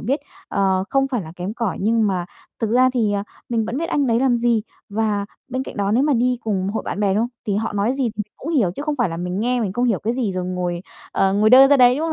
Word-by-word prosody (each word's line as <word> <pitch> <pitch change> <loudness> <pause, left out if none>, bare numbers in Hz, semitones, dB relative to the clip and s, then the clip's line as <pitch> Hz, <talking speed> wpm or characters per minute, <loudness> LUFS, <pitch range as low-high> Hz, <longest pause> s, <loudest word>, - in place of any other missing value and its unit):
biết, 275 +7 -1 0.3
ờ, 190 -1 +1
không 270 -1 +2
phải 245 -7 -2
là 160 0 -10
kém 185 +5 -4
cỏi 230 -6 -2
nhưng 220 +2 +2
mà 180 -3 -1 0.3
thực 220 -1 0
ra 255 +2 +4
thì, 220 -4 +1
à, 200 0 -1 0.2
mình 230 -2 0
vẫn 240 - -4
biết 330 - -2
anh 285 -2 +1
đấy 235 0 +2
làm 260 -2 +3
gì. 235 -2 +2 0.3
Và 205 -1 -1 0.2
bên 255 +1 -2
cạnh - - -9
đó 200 0 0
nếu 245 - +3
mà 295 +1 +2
đi 250 +1 +1
cùng 195 -4 -1
hội 210 - -2
bạn - - -3
bè, 200 -2 +2
đúng 210 - +2
không? 240 - -1 0.2
Thì 200 -2 0
họ 220 +1 -2
nói 205 +4 +1
gì 270 - -2
mình 210 - -1
cũng 325 - -5
hiểu 225 - +2
chứ 285 - -5
không 300 -1 -2
phải 240 -6 +1
là 165 - -5
mình 180 +3 -3
nghe 245 +2 +1
mình 195 -4 -1
không 240 +4 0
hiểu 225 -6 +2
cái 225 - -1
gì, 240 -6 -1
rồi 185 -1 -3
ngồi, 180 -1 -3 0.3
ờ, 195 0 +2
ngồi 210 +2 +3
đơ 265 +2 +9
ra 285 0 +5
đấy, 250 0 +6
đúng 315 - -1
không 325 - -1
225 Hz, 295 wpm, -21 LUFS, 195-250 Hz, 0.3 s, đơ